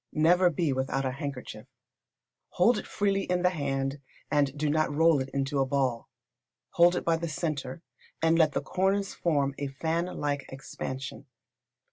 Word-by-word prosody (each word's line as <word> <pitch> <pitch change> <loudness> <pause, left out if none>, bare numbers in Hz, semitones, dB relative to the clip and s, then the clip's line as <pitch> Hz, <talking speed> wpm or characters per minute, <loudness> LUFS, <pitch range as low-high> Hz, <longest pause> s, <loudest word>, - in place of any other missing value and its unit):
Never 175 +4 +4
be 160 -3 0
without 135 +1 -1
a 130 - 0
handkerchief. 140 -2 -6 0.9
Hold 225 +8 +4
it - - -9
freely 195 -1 0
in 180 0 0
the 180 - +4
hand, 135 -3 -2 0.3
and 145 -1 +1
do 150 +1 0
not 155 +1 +1
roll 160 0 +4
it 130 0 -3
into 140 +1 -1
a 135 - +3
ball. 130 -4 -1 0.6
Hold 175 +1 +5
it - - -3
by 165 -1 +3
the 170 0 -4
centre, 150 -2 -4 0.4
and 165 +1 +3
let 160 -3 +4
the - - -1
corners 195 +2 0
form 145 -5 0
a 140 - -2
fan 160 +5 -2
like 145 -5 -3
expansion. 135 +1 -6
150 Hz, 165 wpm, -28 LUFS, 135-170 Hz, 0.9 s, Hold